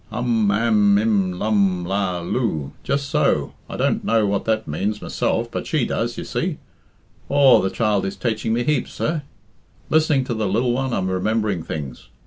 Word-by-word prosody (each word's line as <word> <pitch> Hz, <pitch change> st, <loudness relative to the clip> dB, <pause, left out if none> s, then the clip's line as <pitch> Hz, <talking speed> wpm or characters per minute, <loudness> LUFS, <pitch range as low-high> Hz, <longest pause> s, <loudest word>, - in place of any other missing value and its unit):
"Um 115 Hz, -4 st, +1 dB
am 105 Hz, -1 st, +3 dB
im 100 Hz, -4 st, +1 dB
lum 100 Hz, -3 st, +1 dB
la 95 Hz, -1 st, -1 dB
loo? 85 Hz, -, -2 dB
Just 140 Hz, 0 st, -1 dB
so! -, -, +1 dB, 0.2 s
I -, -, -5 dB
don't -, -, +1 dB
know 115 Hz, -2 st, +2 dB
what 100 Hz, -1 st, -1 dB
that 110 Hz, 0 st, 0 dB
means 100 Hz, +8 st, -2 dB
myself, -, -, -1 dB
but -, -, -4 dB
she -, -, +1 dB
does, -, -, -2 dB
you -, -, -4 dB
see. -, -, -2 dB, 0.7 s
Aw, 140 Hz, -3 st, +6 dB
the 95 Hz, -, 0 dB
child 105 Hz, -2 st, 0 dB
is 95 Hz, -, -5 dB
taiching 110 Hz, -2 st, -1 dB
me 120 Hz, +2 st, +1 dB
heaps, 150 Hz, +3 st, 0 dB
sir. 155 Hz, -1 st, -1 dB, 0.7 s
Listening 155 Hz, -3 st, +3 dB
to 125 Hz, -, -3 dB
the 110 Hz, -2 st, -1 dB
lil 115 Hz, +6 st, +1 dB
one 130 Hz, +1 st, -1 dB
I'm 95 Hz, -5 st, -1 dB
remembering 100 Hz, 0 st, 0 dB
things. 70 Hz, -5 st, -6 dB
110 Hz, 175 wpm, -21 LUFS, 95-120 Hz, 0.7 s, Aw